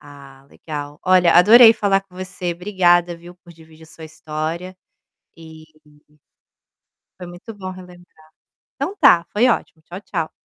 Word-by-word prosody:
Ah, 140 -2 -17
legal. 145 -2 -9
Olha 185 -2 +3
adorei 225 +6 +7
falar 195 -3 -1
com 190 -2 -26
você. 185 -1 -6
Obrigada, 175 -1 0
viu, 175 +1 -15
por 175 -1 -19
dividir 160 -1 -20
a - - -19
sua 160 0 -14
história, 160 +4 -7 0.6
e 160 -1 -15 1.6
foi 180 - -9
muito 175 +6 -12
bom 190 -2 -8
relembrar. 180 -3 -16 0.5
Então 385 - -5
está, 270 - +3
foi 230 +5 +2
ótimo. 165 -9 -3
Tchau, 180 +4 -11
tchau. 165 -6 -5
175 Hz, 145 wpm, -19 LUFS, 160-185 Hz, 1.6 s, adorei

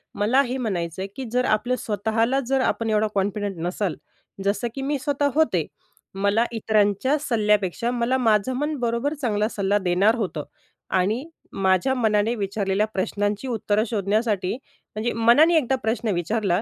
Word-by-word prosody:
मला 230 +7 +3
हे 260 -1 -2
म्हणायचं 185 -8 -3
आहे 195 - -3
की 265 - -5
जर 250 +1 +1
आपलं 230 +2 +1
स्वतःला 225 +5 0
जर 265 0 +2
आपण 230 -3 0
एवढं 215 0 +2
कॉन्फिडंट 200 0 -1
नसाल, 180 0 -2 0.5
जसं 205 +4 0
की 270 - -4
मी 285 +2 -1
स्वतः 285 0 0
होते. 315 0 +2 0.5
मला 200 +4 +2
इतरांच्या 215 +4 +1
सल्ल्यापेक्षा 215 - +1
मला 245 +1 +1
माझं 225 0 +2
मन 295 +2 -1
बरोबर 235 +4 0
चांगला 215 -4 +1
सल्ला 200 -1 0
देणार 195 +3 +2
होतं. 185 -10 -3 0.5
आणि 210 +9 0 0.4
माझ्या 190 +7 +3
मनाने 220 -2 +2
विचारलेल्या 200 -1 0
प्रश्नांची 205 +4 -1
उत्तरं 215 -3 0
शोधण्यासाठी 210 -2 0 0.4
म्हणजे 220 +3 -1
मनाने 240 +9 +5
एकदा 265 -3 +2
प्रश्न 225 0 -1
विचारला, 185 +2 0
220 Hz, 150 wpm, -23 LUFS, 200-245 Hz, 0.5 s, मनाने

